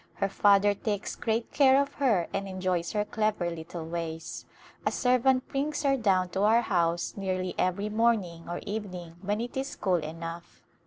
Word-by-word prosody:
Her 195 - 0
father 205 +1 +4
takes 205 0 -3
great 225 0 -2
care 270 -1 +6
of 280 0 -1
her 215 -11 +3
and 195 0 -2
enjoys 185 -2 -1
her 210 -1 +1
clever 210 -5 0
little 165 0 -6
ways. 165 -1 -5 0.4
A - - +1
servant 255 +1 +2
brings 295 +2 -1
her 275 -1 +3
down 190 -7 +2
to 190 +2 -2
our 220 +3 +5
house 170 -5 0
nearly 185 -2 -2
every 190 +3 0
morning 210 -7 0
or 175 - -4
evening 185 -5 -5
when 205 +2 -1
it 240 +1 -5
is 265 +1 -3
cool 185 -3 +1
enough. 165 +2 -7
195 Hz, 170 wpm, -28 LUFS, 175-225 Hz, 0.4 s, care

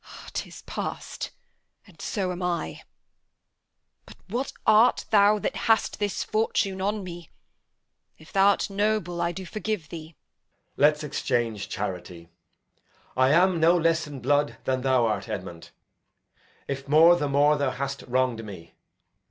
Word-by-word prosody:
'Tis - - -6
past, - - -5 0.6
and - - -16
so 190 -4 -2
am 180 +1 -5
I. 170 - -2 1.3
But - - -13
what 250 +6 -2
art 220 +3 +5
thou 205 0 +5
That - - -3
hast 225 - +2
this 205 -2 -1
fortune 205 -3 0
on 205 +1 -1
me? 175 -2 -9 0.9
If 155 - -17
thou'rt 200 +1 +3
noble, 200 -4 0
I 170 0 +1
do 185 +2 -7
forgive 210 -4 -4
thee. 160 0 -9
Edg. - - -49
Let's 150 +1 +3
exchange 120 -7 -2
charity. 90 -4 -5 0.9
I 130 0 +4
am 175 +3 +4
no 170 +2 +5
less 165 -1 +1
in 140 -3 -8
blood 145 -2 +1
than 130 -1 -1
thou 130 -2 +3
art, 105 -2 -2
Edmund; 90 -5 -6 1.0
If 135 0 -5
more, 160 +4 +7
the 145 -4 -1
more 145 +2 +4
th' 140 -2 0
hast 140 +1 -4
wrong'd 125 -2 0
me. 95 -6 -10
155 Hz, 140 wpm, -26 LUFS, 130-190 Hz, 1.3 s, more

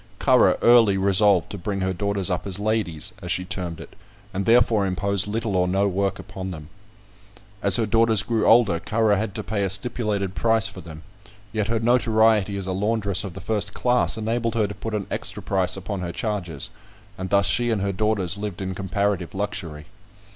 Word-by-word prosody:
Currer - - +4
early 115 -5 +6
resolved 100 -1 +3
to 100 - -6
bring 100 +2 -3
her 95 0 0
daughters 100 0 -2
up 90 - -2
as 95 -2 0
ladies, 100 -5 -2
as 90 -2 -4
she 90 - 0
termed 90 -3 -4
it, 85 - -12 0.4
and 95 +1 -3
therefore 115 -3 +4
imposed 100 +1 -1
little 110 -1 -2
or 90 0 +2
no 95 +2 +1
work 100 0 -1
upon 95 0 -7
them. 80 -4 -9 0.9
As 100 -3 +6
her 115 - +2
daughters 115 -1 +2
grew 115 0 0
older, 110 -8 +5
Currer 110 +1 +1
had 105 0 -3
to 110 - -4
pay 105 -1 -2
a 95 - 0
stipulated 100 -2 -1
price 110 +3 +2
for 95 - -10
them; 80 -1 -11 0.5
yet 110 -2 -1
her 115 0 0
notoriety 110 -4 +2
as 95 - -4
a 95 - -3
laundress 100 0 0
of 100 -4 -6
the 95 - -7
first 105 -2 -2
class 125 -1 +1
enabled 115 +1 -2
her 110 -2 +2
to 100 - -5
put 110 +2 -5
an 100 -2 -3
extra - - -5
price 95 -1 0
upon 95 +1 -5
her 90 -1 -4
charges, 90 - -4 0.4
and 95 0 -6
thus 100 0 +3
she 120 +3 +2
and 110 -4 0
her 100 0 -1
daughters 100 -2 0
lived 100 -3 -5
in 95 -1 -4
comparative 100 -1 -2
luxury. 95 -7 -4
100 Hz, 200 wpm, -23 LUFS, 95-110 Hz, 0.9 s, early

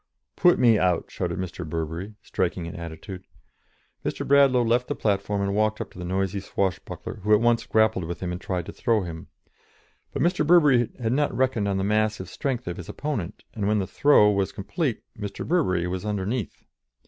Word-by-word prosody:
"Put 175 -1 +5
me 115 -4 +5
out!" 90 -2 +1
shouted - - -3
Mr. 90 -1 -5
Burbery, 80 +5 -4
striking 90 -1 -2
an 85 - -7
attitude. 85 +3 -8 0.8
Mr. - - -3
Bradlaugh 140 -3 +5
left 120 +2 +2
the - - -2
platform 100 -1 0
and 100 0 -1
walked 110 +1 +1
up - - -5
to - - -12
the - - -5
noisy 95 +2 -1
swashbuckler, 95 -1 -3
who 105 +2 -2
at - - +3
once 120 0 +2
grappled 110 -5 +2
with 85 0 -5
him 90 -1 -3
and 90 +1 -5
tried 90 -3 -3
to - - -7
throw 115 -4 +1
him. 80 -2 -7 0.8
But - - -1
Mr. 175 -2 +2
Burbery 145 -8 +5
had 115 -1 0
not 145 +2 0
reckoned 130 -5 +1
on 100 -1 0
the 95 - 0
massive 105 -1 0
strength 125 -3 -3
of 90 - -4
his 90 - -8
opponent, 110 - -4
and 105 -3 -2
when 105 +1 +2
the 100 - 0
"throw" 105 -3 +5
was 100 -2 0
complete 125 - -3
Mr. 100 -2 -6
Burbery 95 - +1
was 90 +1 -3
underneath. 105 +2 -3
105 Hz, 195 wpm, -25 LUFS, 90-120 Hz, 0.8 s, Put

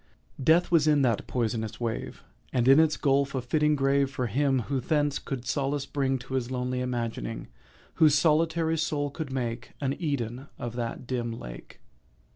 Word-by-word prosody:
Death 165 +6 +4
was 160 -3 +4
in 150 -2 +4
that 120 -5 +1
poisonous 110 -3 -2
wave, 115 -2 -4 0.3
And 125 -1 +1
in 135 +3 +8
its 160 -1 +3
gulf 140 -1 +1
a 130 - 0
fitting 150 +4 +2
grave 140 0 +2
For 130 -2 -2
him 135 +3 +1
who 135 +3 -2
thence 145 +2 0
could 130 -3 -5
solace 140 0 -1
bring 135 -2 0
To 125 +1 -9
his 130 -2 -1
lone 125 0 -2
imagining— 120 -3 -3 0.5
Whose 155 -2 +7
solitary 160 +1 +2
soul 145 -2 -1
could 140 -1 -5
make 120 -2 -3
An 135 -1 0
Eden 135 -4 -3
of 120 -1 -5
that 120 +1 -4
dim 120 -2 -2
lake. - - -10
135 Hz, 170 wpm, -28 LUFS, 120-145 Hz, 0.5 s, in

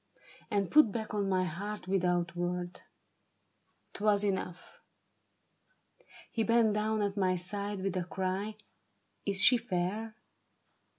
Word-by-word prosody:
And 200 -4 0
put 300 -8 +6
back 220 0 -4
on 200 -2 0
my 185 -1 +2
heart 195 +4 -5
without 175 -2 +1
word. 175 0 -3 1.1
'Twas 205 0 +2
enough. 190 -3 -3 1.5
He 230 - -1
bent 230 -1 +3
down 215 0 0
at 200 -1 -1
my 185 -2 +2
side 200 +2 -3
with 195 -1 -2
a 180 -2 -1
cry: 190 +3 -2 0.4
" - - -45
Is 195 -1 +3
she 250 - +7
fair? 215 +1 -3
195 Hz, 125 wpm, -31 LUFS, 185-210 Hz, 1.5 s, she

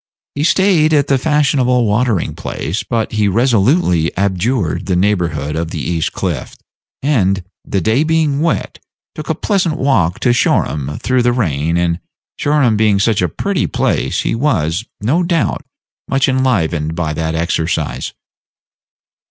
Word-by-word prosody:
He 145 - -2
staid 170 -2 +3
at 145 -2 +3
the 135 -1 +3
fashionable 135 -5 +2
watering 110 -2 0
place; 85 +9 -4
but 115 -2 -2
he 105 -2 +1
resolutely 105 - +2
abjured 100 0 -1
the 95 - +1
neighborhood 85 -7 0
of 80 0 -2
the 85 - -5
East 80 +2 -1
Cliff, - - -4 0.5
and, 95 -10 +1 0.2
the 100 - -2
day 110 - +2
being 155 -3 +1
wet, 165 0 -1 0.3
took - - -8
a - - +1
pleasant 180 -6 0
walk 100 - +1
to 120 - +3
Shoreham 75 - 0
through 130 -1 +1
the 120 0 +2
rain; 85 - 0
and 85 0 0 0.4
Shoreham 145 -6 +2
being 105 -2 +3
such 105 0 +2
a 90 - +1
pretty - - -1
place, - - 0
he - - -1
was, 110 - 0 0.2
no 135 - +1
doubt, 170 -2 0 0.5
much 135 0 +1
enlivened 90 - 0
by 80 -2 -2
that 80 +1 -2
exercise. 80 0 -2
110 Hz, 145 wpm, -16 LUFS, 85-135 Hz, 0.5 s, staid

